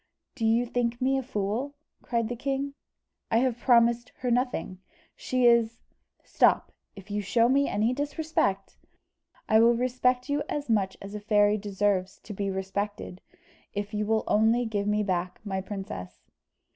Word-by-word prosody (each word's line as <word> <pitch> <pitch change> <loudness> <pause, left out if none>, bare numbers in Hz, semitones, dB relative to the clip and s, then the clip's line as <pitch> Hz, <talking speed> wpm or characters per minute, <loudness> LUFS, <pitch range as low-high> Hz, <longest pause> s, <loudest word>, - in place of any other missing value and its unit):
"Do 230 -5 -1
you 230 +2 +3
think 240 0 -1
me 270 +1 +2
a - - -2
fool?" 240 +3 -3 0.3
cried 235 -2 -1
the 245 - -4
king; 275 +2 -2 0.6
"I 225 - +2
have 245 -1 +1
promised 235 -1 +3
her 250 -1 0
nothing. 245 -6 -1 0.4
She 255 -1 0
is 235 -1 +4 0.2
" - - -44
"Stop - - +2 0.2
if 195 +1 -12
you 205 0 -1
show 230 +4 +2
me 275 +3 +2
any 220 +4 +1
disrespect 285 -9 -1 0.4
" - - -58 0.3
"I 220 - +5
will 235 +1 +5
respect 250 +1 0
you 290 0 0
as 290 -5 -2
much 195 -3 +1
as 200 +1 -8
a 210 - -4
fairy 210 0 +3
deserves 195 -2 -1
to 210 - -8
be 200 0 -2
respected, 190 0 -4 0.5
if 205 +1 -4
you 210 0 -1
will 220 0 +1
only 225 +3 +3
give 205 -2 -2
me 210 0 +1
back 180 -2 -2
my 190 -2 -3
princess." 140 - -7
225 Hz, 170 wpm, -27 LUFS, 205-245 Hz, 0.6 s, I